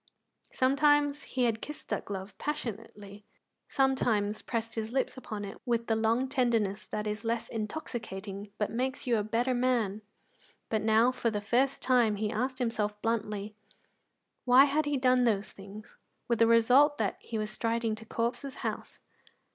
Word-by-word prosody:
Sometimes 290 +2 +3
he 255 - -1
had 225 -2 +1
kissed 300 - -8
that - - -2
glove 195 0 -6
passionately, 210 -7 -5 0.4
sometimes 235 -6 +1
pressed 230 -1 -3
his 220 0 -4
lips 265 +1 0
upon 215 -5 -6
it 195 - -9
with 235 -2 0
the 225 - +1
long 225 +4 +1
tenderness 230 -6 0
that 210 0 -3
is 210 +1 -3
less 230 0 -1
intoxicating 210 -4 -5
but 210 - -1
makes 260 +4 -2
you 240 -3 +2
a 210 - 0
better 235 +4 0
man; 240 -5 +1 0.7
but 220 -1 0
now, 225 +3 +4
for 240 -2 -1
the 210 -2 -2
first 245 +6 +1
time, 240 -5 +3
he 210 +1 -2
asked 255 +4 -2
himself 215 -4 -1
bluntly 210 -2 -2 0.9
why 255 +2 +7
he 290 +1 0
had 270 - 0
done 255 -1 +4
those 210 -4 +1
things, 205 +3 -12 0.3
with 235 -2 +1
the 230 - +6
result 250 +6 +5
that 210 -3 -1
he 225 - -5
was 215 0 -2
striding 230 -1 -1
to 220 +1 -7
Corp's 235 +2 -2
house. - - -5
230 Hz, 165 wpm, -30 LUFS, 210-255 Hz, 0.9 s, why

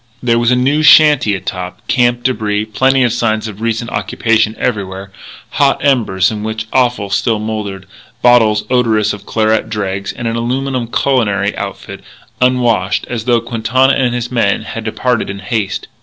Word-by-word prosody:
There 115 -1 +2
was 120 0 +2
a 125 - +3
new 135 +5 +1
shanty 150 -8 +5
atop, 90 -1 -6
camp 120 -1 +1
débris, 110 -4 -1
plenty 135 +2 +3
of 120 -3 +1
signs 110 -1 -1
of 105 0 -9
recent 115 +1 -2
occupation 110 -1 0
everywhere, 100 -4 -3 0.4
hot 140 -1 +2
embers 110 -9 +2
in 105 -1 -5
which 110 0 -4
offal 120 -6 +1
still 115 +1 +1
smouldered, 105 -3 -5 0.4
bottles 115 -4 +4
odorous 110 -4 +2
of 100 - -11
claret 110 0 0
dregs, 100 -2 -3
and 120 - -5
an 115 - -2
aluminum 125 +1 -2
culinary 105 -6 0
outfit, - - -7 0.4
unwashed, 120 -7 +1
as 115 -2 -4
though 120 -2 +2
Quintana 120 +3 +1
and 125 -3 0
his 120 0 -4
men 110 -4 +1
had 115 0 -7
departed 120 +1 -1
in 100 - -5
haste. 100 -1 -3
115 Hz, 160 wpm, -14 LUFS, 105-125 Hz, 0.4 s, shanty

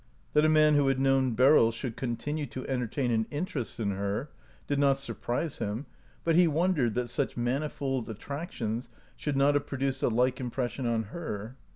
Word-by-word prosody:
That 150 - +5
a - - +5
man 155 -1 +5
who 145 -2 +4
had 135 -1 +2
known 135 -3 +3
Beryl 130 -1 +6
should 115 +1 -5
continue 145 +4 -3
to 130 - -7
entertain 125 0 -1
an 110 -1 +1
inter 150 0 -3
est 120 0 -6
in 105 -3 0
her 100 +8 -2 0.3
did 145 -1 0
not 140 -1 +4
surprise 135 +2 -3
him, 105 +7 -3 0.4
but 165 -1 +2
he 175 0 +6
won 170 +5 +2
dered 120 - 0
that 125 0 0
such 120 - -2
manifold 135 0 -1
attractions 120 - -4 0.3
should 145 -2 -2
not 140 +1 +4
have 145 0 0
produced 135 -1 -2
a - - +3
like 125 +3 +2
impression 125 0 -2
on 115 -1 +1
her. 115 -8 -5
135 Hz, 190 wpm, -29 LUFS, 120-145 Hz, 0.4 s, Beryl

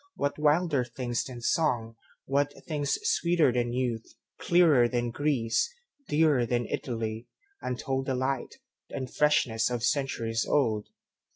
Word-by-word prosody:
What 145 +1 -2
wilder 150 -2 +3
things 120 0 -3
than 125 -2 -8
song, 120 -3 0 0.3
what 145 +1 0
thingsSweeter 170 - +1
than 120 -1 0
youth, 120 -3 -3 0.2
clearer 160 -9 +5
than 120 -1 -1
Greece, 140 - 0 0.4
Dearer 150 -6 +3
than 120 0 0
Italy, 115 -2 -4 0.3
untoldDelight, 130 0 -2 0.4
and 130 -2 -5
freshness 135 -7 +2
centuries 115 -4 0
old? 110 -7 +1
130 Hz, 105 wpm, -28 LUFS, 120-145 Hz, 0.4 s, clearer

